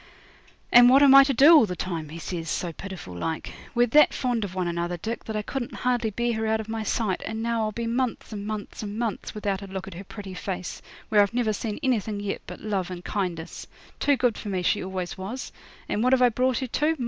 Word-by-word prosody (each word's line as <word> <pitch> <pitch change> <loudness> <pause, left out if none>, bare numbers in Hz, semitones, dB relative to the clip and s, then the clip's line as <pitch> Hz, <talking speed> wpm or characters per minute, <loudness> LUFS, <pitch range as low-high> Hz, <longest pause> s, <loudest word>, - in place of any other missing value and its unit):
'And 245 0 +9
what 270 +3 +7
am 275 -1 +8
I 275 0 +10
to 275 - +1
do 285 +6 +8
all 280 -8 +6
the 180 - -4
time?' 165 -3 -4
he 160 - -8
says 165 -1 -5
so 170 -1 -2
pitiful 185 - -8
like. 160 - -4 0.2
'We're 240 0 +5
that 300 +5 +5
fond 245 -4 0
of 190 -2 -5
one 185 -2 -1
another, 170 +1 -2
Dick, 225 +7 -5
that 220 - -5
I 210 - -1
couldn't 265 +3 -4
hardly 245 -3 +2
bear 235 +3 -1
her 220 0 -1
out 220 0 +1
of 220 - -6
my 225 0 -3
sight, 215 -3 -1
and 220 0 -4
now 230 -1 0
I'll 215 -1 0
be 235 +2 -4
months 235 -1 -2
and 205 0 -5
months 215 -1 -5
and 210 0 -5
months 230 -3 -3
without 200 -2 -2
a 200 - -7
look 190 0 -5
at 195 - -8
her 180 +3 -8
pretty 200 -1 -9
face, 185 0 -5 0.3
where 210 -1 +5
I've 205 +3 +1
never 235 -3 +1
seen 210 0 -4
anything 220 -5 0
yet 205 -1 -3
but - - -8
love 200 -3 -2
and 180 -1 -7
kindness. 175 -5 -4 0.3
Too 285 -1 +3
good 245 -4 +1
for 210 - -6
me 185 -2 -1
she 205 - +1
always 185 -1 -5
was; 215 +8 -5 0.4
and 210 - -1
what 255 +1 +4
have 260 - +4
I 245 - +6
brought 250 +1 +1
her 260 - -2
to? 305 +6 0
215 Hz, 250 wpm, -26 LUFS, 190-240 Hz, 0.4 s, I